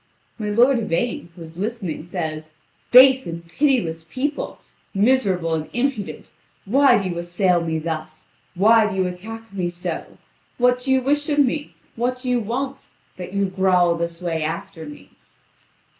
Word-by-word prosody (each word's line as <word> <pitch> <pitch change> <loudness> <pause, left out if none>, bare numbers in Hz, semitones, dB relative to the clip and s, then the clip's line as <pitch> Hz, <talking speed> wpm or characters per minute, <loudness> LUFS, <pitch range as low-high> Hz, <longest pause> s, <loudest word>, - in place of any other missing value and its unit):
My 210 -1 -2
lord 240 +4 +4
Yvain, 210 -2 -2
who 170 - -10
is 160 +1 -12
listening, 195 -7 -4
says: 155 -3 -4 0.4
"Base 260 0 +7
and 170 0 -7
pitiless 170 - 0
people, 270 - -3 0.4
miserable 195 -7 +2
and 155 -1 -2
impudent, 240 -4 -3 0.3
why 275 +7 +5
do 195 - -2
you 175 -2 -3
assail 175 +1 +1
me 160 -1 -1
thus, 155 -1 -5 0.3
why 215 +3 +5
do 190 - -5
you 190 -1 +1
attack 220 +5 -7
me 180 -3 -1
so? 175 0 -6 0.4
What 250 0 +3
do 260 +2 -2
you 260 -1 +3
wish 290 +3 0
of 290 - 0
me, 290 +1 +1 0.2
what 250 +2 -1
do 250 - -1
you 245 - +2
want, 260 +5 -4 0.3
that 180 0 -7
you 200 0 +1
growl 185 -2 +3
this 170 +1 -4
way 165 -2 -1
after 160 +1 -5
me?" 95 -10 -12
195 Hz, 160 wpm, -22 LUFS, 170-250 Hz, 0.4 s, Base